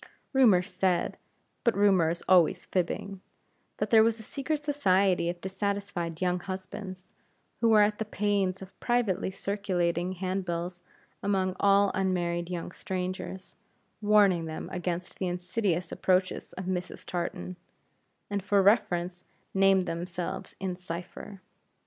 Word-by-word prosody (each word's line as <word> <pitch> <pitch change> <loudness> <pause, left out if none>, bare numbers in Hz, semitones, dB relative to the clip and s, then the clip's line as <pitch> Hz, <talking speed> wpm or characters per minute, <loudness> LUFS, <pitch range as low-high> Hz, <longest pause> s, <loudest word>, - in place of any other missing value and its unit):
Rumor 225 -9 +6
said 185 -2 0 0.4
but 235 -4 +2
rumor 195 -5 +4
is 170 +1 -3
always 180 0 +4
fibbing 185 +1 -2 0.6
that - - -2
there 225 -1 +8
was 225 0 +2
a - - -8
secret 290 +5 -3
society 195 - +2
of 175 0 -4
dissatisfied 190 -4 -3
young 180 -1 +1
husbands, 185 0 -7 0.5
who 230 - +3
were 215 -1 +7
at 210 0 +1
the 220 - -1
pains 200 -2 0
of 190 - -15
privately 240 -7 +1
circulating 185 -3 -1
handbills 180 -1 -3 0.4
among 190 -2 0
all 200 0 +4
unmarried 175 -2 0
young 175 -1 -4
strangers, 185 +1 -5 0.5
warning 205 -5 +4
them 160 -1 -6
against 180 0 -4
the 185 - 0
insidious 180 0 -1
approaches 185 0 0
of 185 - -6
Mrs. 180 -1 -4
Tartan; 180 +1 -4 0.7
and, 200 -1 -2
for 200 0 +3
reference, 180 -4 +2 0.3
named 195 -1 +4
themselves 175 +1 -4
in 185 -2 -3
cipher. 180 +2 -7
185 Hz, 130 wpm, -29 LUFS, 180-200 Hz, 0.7 s, there